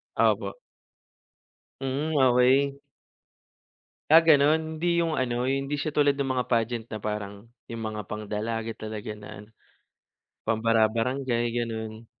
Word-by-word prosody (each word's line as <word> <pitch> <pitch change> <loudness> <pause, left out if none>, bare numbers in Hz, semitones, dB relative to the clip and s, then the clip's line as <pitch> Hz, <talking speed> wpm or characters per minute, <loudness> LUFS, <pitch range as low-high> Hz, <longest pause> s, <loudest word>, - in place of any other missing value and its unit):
Opo. - - +1 1.2
Mm, 135 +4 -2 0.2
okey. 135 +3 +3 1.3
Ah, 165 +2 +7
ganun? 155 +1 +3
Hindi 175 0 +2
yung 165 - -1
ano, 125 -3 -1
hindi 135 +2 -1
siya 145 +1 -3
tulad 145 -2 +3
nung 135 -2 -1
mga 125 -1 -2
pagent 115 -1 0
na 110 - -4
parang 105 -1 -5 0.2
yung 115 - -5 0.2
mga 105 - -4
pang-dalaga 110 +2 -3
talaga 110 -1 -6
na 105 0 -11
ano, 105 +1 -13 1.0
pang 110 0 0
bara-barangay, 115 +2 +1
ganun? 115 -1 -4
120 Hz, 125 wpm, -26 LUFS, 110-140 Hz, 1.3 s, Ah